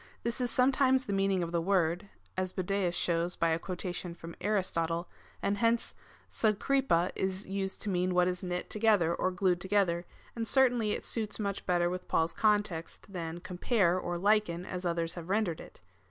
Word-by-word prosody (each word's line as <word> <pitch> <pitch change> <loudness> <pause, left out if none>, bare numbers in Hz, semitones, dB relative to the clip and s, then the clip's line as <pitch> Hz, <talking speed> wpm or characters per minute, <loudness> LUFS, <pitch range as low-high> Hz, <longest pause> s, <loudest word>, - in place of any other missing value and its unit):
This 235 +2 -2
is 245 - 0
sometimes 260 +1 +3
the 200 - -2
meaning 195 -2 +2
of 170 - -4
the 170 -1 +1
word,^ 180 +1 +1 0.3
(as 185 0 -2
Budajus 185 -1 0
shows 170 +1 0
by 165 - +1
a 160 0 +1
quotation 180 -1 -5
from 165 0 -9
Aristotle,) 175 -4 0 0.4
and 200 0 0
hence 230 +1 +1 0.3
avyKpifxa 215 -4 +1
is 190 +1 -2
used 195 0 -3
to 210 - -2
mean 180 -1 0
what 180 0 +4
is 180 0 -2
knit 180 -1 -4
together 210 -6 +3
or 185 - 0
glued 180 -1 +1
together, 185 -3 +1 0.3
and 230 -1 -2
certainly 245 -5 +4
it - - -4
suits 215 -2 -1
much 200 -2 -3
better 175 -1 +2
with 180 +1 -4
Paul's 165 +1 +1
context 205 -3 0
than 170 -1 -5
compare 180 0 +1
or 175 -1 -3
liken, 195 -2 +2
as 180 -1 -4
others 170 -1 -1
have 170 0 -8
rendered 195 -5 0
it. - - -14
185 Hz, 180 wpm, -31 LUFS, 175-210 Hz, 0.4 s, what